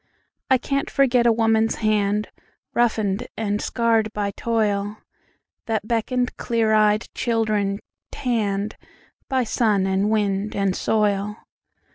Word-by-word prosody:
I 260 - +5
can't 275 +2 -2
forget 250 -3 +3
a - - +6
woman's 225 0 +2
hand, 210 -1 0 0.4
Roughened 220 -3 +1
and 210 -1 -1
scarred 225 -2 +1
by 205 -1 -1
toilThat 215 +1 -3
beckoned 240 +3 -1
clear 230 -2 +1
eyed 215 0 +3
children 215 -4 0 0.3
tannedBy 225 +3 -3
sun 215 -4 +1
and 190 +2 +1
wind 205 -1 0
and 195 -2 +1
soil. 210 -1 0
215 Hz, 105 wpm, -23 LUFS, 205-230 Hz, 0.4 s, a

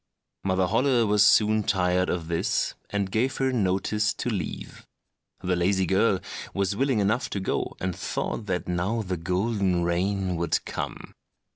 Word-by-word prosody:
Mother 95 -1 +2
Holle 120 +4 +2
was 105 -1 +3
soon 110 0 +5
tired 90 -3 +1
of 85 -2 -2
this, 85 -1 0 0.2
and 100 -2 -2
gave 125 +5 0
her 130 -1 +1
notice 105 0 +1
to 125 - -2
leave. 95 -7 -5 0.6
The 90 0 +1
lazy 95 +2 +2
girl 95 +1 +2 0.3
was 100 0 0
willing 135 +1 +1
enough 105 +5 +1
to 100 - -3
go, 95 - -2
and 90 -1 -2
thought - - -3
that - - -2
now 90 +6 -1
the 90 -2 -3
golden 90 +1 0
rain 90 +1 0
would 85 -1 0
come. - - -5
95 Hz, 155 wpm, -26 LUFS, 90-110 Hz, 0.6 s, soon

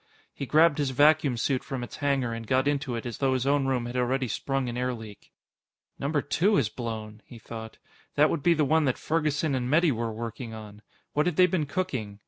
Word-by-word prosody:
He 140 - -5
grabbed 155 +3 +4
his 145 -2 +1
vacuum 145 0 +4
suit 130 +2 0
from 130 -2 -4
its 115 - -8
hanger 135 -5 0
and 115 -1 -6
got 130 +3 +2
into 140 -3 -1
it 115 - -5
as 120 -3 -5
though 135 -1 +2
his 130 0 -1
own 140 -1 +2
room 125 -3 0
had 120 +1 -6
already 130 +1 0
sprung 135 +3 -2
an 120 - -4
air 125 0 -1
leak. 110 -3 -12 0.7
Number 145 +1 0
Two 195 +8 +2
has 115 - +2
blown! 110 -2 -6
he 120 - -13
thought. 110 0 -9 0.4
That - - +4
would - - -1
be 170 +3 +4
the 150 -2 +2
one 155 +2 +3
that 130 - +1
Ferguson 155 -2 0
and 125 -1 -1
Metty 160 +2 +4
were 115 -2 -2
working 115 +1 -6
on. 105 -1 -10 0.3
What 150 +3 +2
had 175 - 0
they 185 - +6
been 170 -4 0
cooking? 130 - -3
130 Hz, 225 wpm, -27 LUFS, 115-145 Hz, 0.7 s, they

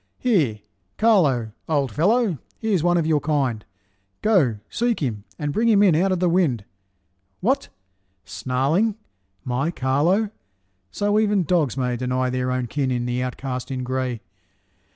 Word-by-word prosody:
Here, 155 - +1 0.4
Carlo, 150 - +3 0.2
old 140 -5 +1
fellow, 195 - +2 0.2
he's 215 -6 0
one 175 +1 +3
of 165 - +1
your 155 -2 +2
kind, 135 -8 -1 0.6
Go, 170 - +3
seek 240 -1 0
him, 110 -8 -3
and 145 -1 -3
bring 230 +2 +2
him 205 -2 +5
in 190 -5 +5
out 190 +4 +2
of 185 - 0
the 180 - +2
wind. 165 - +1 0.7
What! 255 +9 0 0.6
snarling, 135 - 0 0.5
my 130 +5 -1
Carlo! 170 +9 +1 0.6
So 205 - +1
even 205 -3 +2
dogs 155 -7 +1
may 125 -2 -1
Deny 125 +1 -1
their 130 0 -1
own 125 -1 -1
kin 135 +2 -1
in 120 -1 -1
the 125 0 -1
outcast 125 0 -4
in 130 -1 -3
gray. 130 -2 -2
145 Hz, 150 wpm, -23 LUFS, 125-190 Hz, 0.7 s, him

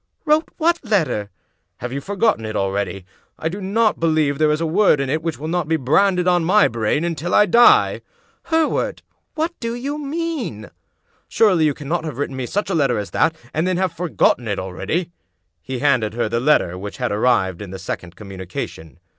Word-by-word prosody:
" - - -49
"Wrote 310 +1 +2
what 340 0 +1
letter?" 160 - 0 0.5
"Have 125 +1 -6
you 140 - -3
forgotten 200 - 0
it 110 0 -5
already? 100 -1 -2 0.3
I 160 - -2
do 195 +4 -6
not 215 +3 +1
believe 155 -3 +2
that 140 - -11
there 155 -1 +4
is 150 - 0
a 165 - -1
word 170 -1 +3
in 135 -1 -1
it 155 +2 0
which 165 -1 -3
will 155 - -6
not 170 -1 -1
be 160 - +2
branded 180 +6 +2
on 175 -1 +3
my 200 +5 +4
brain 115 +6 -1
until 170 0 -2
I 210 - +6
die." 235 +5 +5 0.4
"Hereward! 320 -1 0 0.3
What 325 +2 -1
do 230 0 -3
you 280 +5 -4
mean?" 285 - -4 0.6
"Surely 185 -8 +3
you 145 -2 +1
cannot 155 +3 -3
have 155 -6 -5
written 140 -1 -3
me 130 -2 -4
such 205 - -2
a - - 0
letter 135 -7 +2
as 100 -4 -4
that, 160 0 +2 0.2
and 160 +3 0
then 185 -1 0
have 185 -2 0
forgotten 165 -7 +1
it 100 - -1
already? 160 - -3 0.2
" - - -50
He 130 0 -5
handed 125 -6 +1
her 120 - 0
the 115 +2 -1
letter 120 - +2
which 100 +2 -7
had 125 -3 -2
arrived 105 -5 +1
in 100 - -7
the 95 - -7
sec 95 -1 -5
ond 90 0 -13
communication. 95 - -7
155 Hz, 210 wpm, -20 LUFS, 115-195 Hz, 0.6 s, I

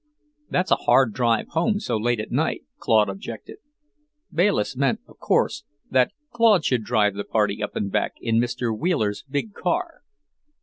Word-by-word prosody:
"It's 180 +1 0
a - - +6
hard 130 -5 +3
drive 115 -2 +1
home, 205 +6 +1
so - - -2
late 120 +2 0
at 110 - -5
night," - - 0 0.2
Claude 110 -2 +3
objected. 100 +3 -7 0.8
Bayliss 170 - +1
meant, 135 0 +1
of - - -19
course, 150 - +1 0.3
that 130 -1 +3 0.2
Claude 225 -7 +4
should 125 -4 +1
drive 105 -1 +2
the 100 +1 -4
party 105 -1 0
up 105 - -4
and 100 -1 -2
back - - 0
in 115 -1 +1
Mr. 120 -1 -1
Wheeler's 110 - -1
big 145 +10 -2
car. 340 - -2
120 Hz, 165 wpm, -24 LUFS, 110-170 Hz, 0.8 s, a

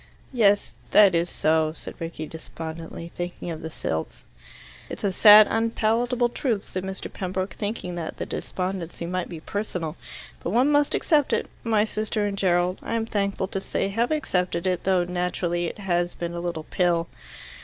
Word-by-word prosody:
"Yes. 205 -4 +3 0.2
That 200 -3 +7
is 170 +1 +1
so," 155 0 +2
said - - -8
Rickie 165 -1 -5
despondently, 165 +1 -7
thinking 175 0 -5
of 160 - -6
the 160 - -5
Silts. 80 - -4 0.7
"It's - - -7
a 200 - +2
sad 210 +2 +9
unpalatable 230 +2 +1
truth," 230 -4 -1
said 185 - -4
Mr. 190 0 -6
Pembroke, 185 0 -3
thinking 205 -4 -4
that 165 -2 -5
the - - -3
despondency 180 -2 -4
might 180 +1 -2
be 165 -3 -7
personal, 180 -5 -3 0.5
"but - - -3
one 250 +9 +3
must 290 0 +3
accept 295 -4 +2
it. - - -1
My 220 -2 +3
sister 215 -1 -1
and 200 -1 -1
Gerald, 180 -1 +1
I - - -3
am 225 -1 0
thankful 200 -3 -1
to 195 - -3
say, 195 - -1
have 230 +4 0
accepted 180 - 0
it, 185 -1 0
though 185 -2 +3
naturally 175 -1 -1
it - - -6
has 175 -3 0
been 170 0 -4
a 170 - -4
little 170 -2 -3
pill." 170 -2 +2
185 Hz, 175 wpm, -25 LUFS, 170-210 Hz, 0.7 s, sad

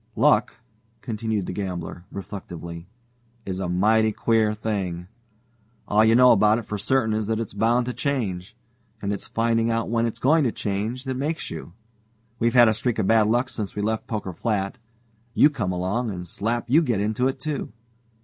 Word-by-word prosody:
Luck," - - +3 0.5
continued 110 -4 -2
the - - -4
gambler, 90 -2 -5
reflectively, 85 -3 -8 0.6
"is 95 -1 -4
a 95 -2 -2
mighty 110 +5 +3
queer 110 0 +2
thing. 95 -5 -3 0.8
All 105 +1 +4
you 110 +1 +5
know 125 +1 +7
about 105 +1 +4
it 120 - -4
for 105 -1 -4
certain 110 +1 +1
is 110 -1 -1
that 110 0 0
it's 115 -4 -4
bound 115 +4 +2
to 125 - -3
change. 110 - -3 0.4
And 100 0 -2
it's 100 - -5
finding 115 0 +1
out 115 0 -1
when 115 0 +2
it's 115 - -5
going 155 +4 +3
to 120 - +1
change 110 +6 -3
that 130 -2 -3
makes 155 +5 -3
you. 80 +1 -8 0.7
We've 115 +1 +1
had 120 -2 +8
a 110 - +4
streak 120 +2 -1
of 110 - +1
bad 110 0 +4
luck 120 +4 +2
since 110 -6 -5
we 105 - -2
left 110 +1 -2
Poker 105 -5 -4
Flat 105 +2 -2 0.6
you 145 - +6
come 110 -11 -2
along, 95 +7 -1
and 90 -3 -5
slap 115 +7 -2
you 145 +7 +5
get 120 -10 0
into 110 +5 +1
it, 135 0 -3
too. 145 -3 -4
110 Hz, 190 wpm, -24 LUFS, 100-120 Hz, 0.8 s, had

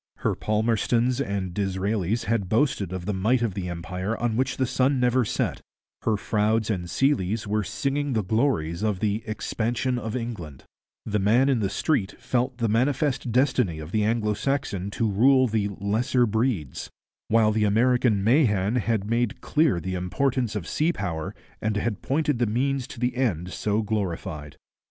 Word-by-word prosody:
Her - - +1
Palmerstons 115 +4 +1
and 100 -7 -2
Disraelis 100 +2 -1
had 100 -4 -1
boasted 110 - +1
of 95 -2 -5
the 105 - -1
might 115 +6 +1
of 110 -5 0
the 90 -2 -4
empire 90 +5 -3
on 120 -2 -1
which 130 +1 0
the 130 - +2
sun 130 +2 +1
never 125 +1 +3
set; 105 - -2 0.4
her 110 -2 +1
Froudes 110 +2 +1
and 90 -4 -3
Seeleys 115 -6 +1
were 105 +1 0
singing 140 +6 -1
the 110 -2 +1
glories 95 - 0
of 105 -3 0
the 105 +1 0
'expansion 120 +3 -1
of 110 -1 -4
England'; 105 - -6 0.4
the 105 -1 0
man 115 +8 +3
in 130 -4 +2
the 100 -3 0
street 105 - -1
felt 125 0 -1
the 115 -2 0
manifest 130 +3 +1
destiny 125 - +2
of 80 +1 -8
the 110 0 +1
Anglo 105 -1 +1
Saxon 105 -5 -2
to 115 +2 -1
rule 130 +6 +4
the 110 -3 0
'lesser 110 +6 +1
breeds'; 110 - -1 0.4
while 110 -1 +4
the 110 0 +1
American 115 -1 +3
Mahan 110 -3 +3
had 110 -3 0
made 115 0 0
clear 150 - +2
the 95 +3 -4
importance 115 +6 -1
of 100 -6 -4
sea 160 +3 +1
power 80 - -4 0.3
and 105 -1 0
had 105 -1 -2
pointed 145 -1 0
the 120 - +2
means 130 +4 0
to 125 - -10
the 125 0 0
end 95 -9 -1
so 105 +1 0
glorified. 85 -8 -3
110 Hz, 170 wpm, -25 LUFS, 100-125 Hz, 0.4 s, rule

